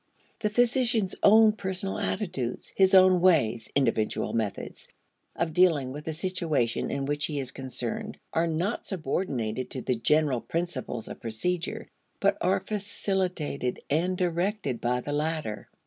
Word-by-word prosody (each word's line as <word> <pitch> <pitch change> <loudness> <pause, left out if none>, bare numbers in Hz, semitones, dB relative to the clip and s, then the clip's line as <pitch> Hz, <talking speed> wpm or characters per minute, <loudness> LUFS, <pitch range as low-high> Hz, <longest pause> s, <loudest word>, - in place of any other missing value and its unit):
The 210 - 0
physician's 235 -3 +2
own 220 +1 +7
personal 195 -2 -3
attitudes, 135 - -3
his 190 0 +5
own 185 -1 +7
ways 130 -11 +3
(individual 115 -6 +1
methods) 110 -3 -3 0.5
of 165 -2 -1
dealing 160 -7 +3
with 150 +3 -8
the 160 - -2
situation 160 -8 -1
in 140 - -2
which 145 +1 -1
he 150 - -4
is 130 -2 -3
concerned, 215 - -5 0.2
are 165 +1 +2
not 170 +7 -2
subordinated 135 - -2
to 130 - -5
the 130 - +1
general 130 +2 +2
principles 155 -9 -3
of - - -9
procedure, 165 - -2 0.3
but - - +3
are - - +2
facilitated 190 -9 -2
and 180 +5 +1
directed 175 - -1
by 125 +1 0
the 145 - -4
latter. 150 -7 -2
160 Hz, 140 wpm, -27 LUFS, 130-190 Hz, 0.5 s, own